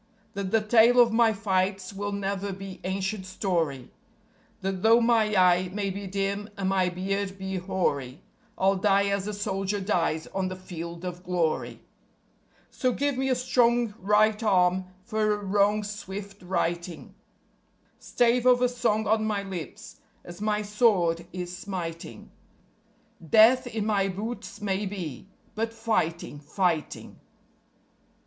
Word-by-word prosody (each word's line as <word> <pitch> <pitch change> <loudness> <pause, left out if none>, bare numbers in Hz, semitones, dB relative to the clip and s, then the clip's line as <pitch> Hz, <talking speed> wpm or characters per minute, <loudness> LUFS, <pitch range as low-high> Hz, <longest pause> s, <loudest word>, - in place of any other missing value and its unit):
That 200 -2 -3
the 225 +2 +2
tale 230 +3 +5
of 235 -2 +5
my 230 -1 +4
fights 195 -2 -1
will 205 +1 -4
never 200 0 -3
be 195 0 -8
ancient 190 +2 -2
story; 165 - -2 0.7
That 190 -1 -3
though 225 +2 +6
my 230 -3 +2
eye 180 -1 +4
may 200 0 -2
be 200 +1 -6
dim 200 +2 -2
and 190 -1 -1
my 190 -2 +2
beard 195 +2 -3
be 190 0 -4
hoary, 170 -6 -2 0.3
I'll 195 +1 +2
die 200 0 +3
as 200 0 -1
a 210 - -3
soldier 195 0 -2
dies 170 -5 0
on 190 -1 -1
the 185 - -5
Field 170 -1 -8
of 180 0 -5
Glory. 175 -4 -1 0.9
_So 255 -3 0
give 285 -1 0
me 265 +1 -1
a 255 - +3
strong 240 -2 +2
right 210 +2 +3
arm 185 -3 +2 0.2
for 215 -1 0
a - - -5
wrong's 205 +1 +1
swift 200 0 -8
righting; 175 -2 -3 0.9
Stave 245 +1 +2
of 250 0 +5
a 250 - +4
song 225 -3 0
on 215 +1 +2
my 205 -2 -1
lips 180 -8 -8 0.3
as 175 +2 -10
my 210 0 0
sword 190 -6 +2
is 180 -1 -5
smiting; 170 - -7 0.9
Death 225 - +5
in 220 -3 -3
my 200 -3 +1
boots 210 +6 -6
may 200 0 -1
be, 180 -6 -6 0.3
but 225 +1 -2
fighting, 215 -10 -2
fighting. 165 +1 -2
195 Hz, 140 wpm, -27 LUFS, 185-215 Hz, 0.9 s, though